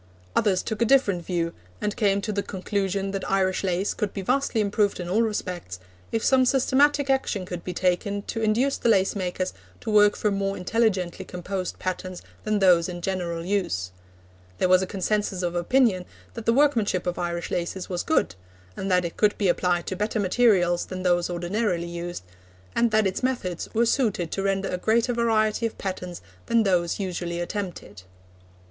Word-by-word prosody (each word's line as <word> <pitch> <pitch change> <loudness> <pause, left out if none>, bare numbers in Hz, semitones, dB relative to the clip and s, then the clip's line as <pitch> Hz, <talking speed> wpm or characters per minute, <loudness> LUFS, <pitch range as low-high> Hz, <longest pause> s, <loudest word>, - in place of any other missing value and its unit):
Others 195 -4 +2
took 220 0 -4
a - - +5
different 210 -9 +3
view, 170 -1 -1 0.3
and 210 - -2
came 200 -2 +2
to 215 - -3
the 200 -1 -1
conclusion 195 0 -2
that 195 -1 -4
Irish 190 -1 +1
lace 185 +1 0
could 210 -2 -3
be 195 - -3
vastly 255 +1 +1
improved 205 -1 +1
in 175 - -4
all 200 +6 +2
respects, 180 - -3 0.3
if 225 - -1
some 265 -1 +4
systematic 275 +2 +3
action 265 -8 0
could 180 -1 -6
be 180 - -4
taken 185 +3 0
to 225 - -4
induce 235 +6 +2
the 235 - +1
lace 195 -2 +3
makers 185 -1 -2 0.3
to - - -4
work 210 -1 +5
from 210 -2 0
more 195 0 -1
intelligently 185 -2 0
composed 185 +1 -5
patterns 185 0 -4 0.2
than 215 0 +1
those 180 -3 +4
in 175 -1 -5
general 170 -3 -2
use. 175 - -1 0.7
There - - +2
was 185 0 +5
a 190 - -2
consensus 195 0 -1
of 175 -1 -1
opinion 185 +1 +2 0.3
that 230 -2 -8
the - - +6
workmanship 235 -9 +2
of 180 0 -2
Irish 170 -1 -3
laces 180 +2 -3
was 180 -2 -2
good, 315 - +1 0.4
and 195 - -4
that 180 -1 +3
it 170 - -5
could 210 -1 +3
be 200 -3 +2
applied 175 0 +1
to 190 - -3
better 210 +3 -1
materials 185 -4 +3
than 185 0 -5
those 175 -1 +2
ordinarily 175 +1 -1
used, 170 - -5 0.5
and 235 0 +3
that 215 -1 +3
its 190 - -1
methods 245 -10 -2
were 235 +2 +4
suited 215 - 0
to 195 - -2
render 195 0 0
a 180 - -2
greater 230 +4 +2
variety 225 -1 +2
of 225 - -10
patterns 180 -2 -5 0.2
than 230 -1 +3
those 180 -3 +1
usually 175 -3 -3
attempted. 175 - -5
195 Hz, 185 wpm, -25 LUFS, 180-215 Hz, 0.7 s, the